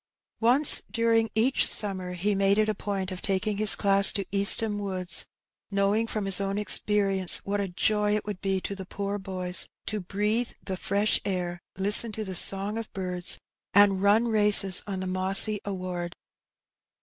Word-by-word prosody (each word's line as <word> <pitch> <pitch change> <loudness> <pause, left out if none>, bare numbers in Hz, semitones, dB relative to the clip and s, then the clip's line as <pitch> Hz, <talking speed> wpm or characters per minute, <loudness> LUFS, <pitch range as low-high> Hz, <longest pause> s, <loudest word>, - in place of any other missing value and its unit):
Once 250 +6 +6
during 230 -1 -1
each 240 +5 0
summer 185 -3 +3
he 195 +4 -3
made 195 +1 0
it 215 0 0
a 215 - -2
point 195 -2 -6
of 185 - -8
taking 200 +1 -3
his 215 0 +2
class 200 -1 +4
to 195 - -4
East 200 +2 +4
ham 210 -2 -4
Woods, 185 -3 -1 0.4
knowing 200 +3 -1
from 215 -2 -5
his 195 0 +2
own 195 0 -4
experience 200 -3 0
what 205 +1 -4
a 200 - -4
joy 210 +3 -1
it 210 - -5
would 205 -3 -8
be 195 -1 -2
to 200 - -7
the 195 -1 -9
poor 200 +1 -6
boys 185 -2 -3 0.2
to 215 - -4
breathe 210 +5 -3
the 190 - -5
fresh 200 +3 -1
air, 180 -3 -5 0.2
listen 210 +4 +4
to 215 +1 -6
the 190 - -8
song 195 +4 +4
of 225 - -10
birds, 180 -2 -2 0.4
and 200 -2 +3
run 210 +4 +1
races 205 -4 +4
on 190 -2 -6
the - - -6
mossy 190 +3 +3
sward. 180 -3 -7
200 Hz, 175 wpm, -25 LUFS, 190-210 Hz, 0.4 s, Once